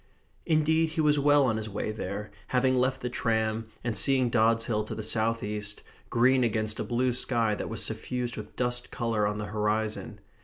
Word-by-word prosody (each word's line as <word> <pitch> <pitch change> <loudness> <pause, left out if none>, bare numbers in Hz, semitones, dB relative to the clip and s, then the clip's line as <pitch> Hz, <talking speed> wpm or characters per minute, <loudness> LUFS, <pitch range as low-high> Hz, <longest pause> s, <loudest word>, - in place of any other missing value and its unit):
Indeed 160 0 +3
he 160 0 -1
was 150 -1 +3
well 145 0 +5
on 115 -3 +1
his 110 0 -4
way 105 +1 -3
there, 105 0 -5 0.2
having 130 0 +2
left 130 +1 +1
the 125 - -2
tram, 110 -2 0 0.2
and 120 -2 -2
seeing 130 +3 +3
Dods 115 -1 +3
Hill 105 -2 0
to - - -6
the 110 - -5
south 115 +1 +1
east, 105 0 -4 0.3
green 130 +2 +4
against 110 -2 -1
a - - 0
blue 125 +1 0
sky 115 -3 +1
that - - -4
was 115 - 0
suffused 120 +2 -2
with - - -9
dust 125 0 -1
colour 115 -4 0
on 105 0 -2
the 105 - -4
horizon. 105 +1 -2
115 Hz, 195 wpm, -28 LUFS, 110-130 Hz, 0.3 s, well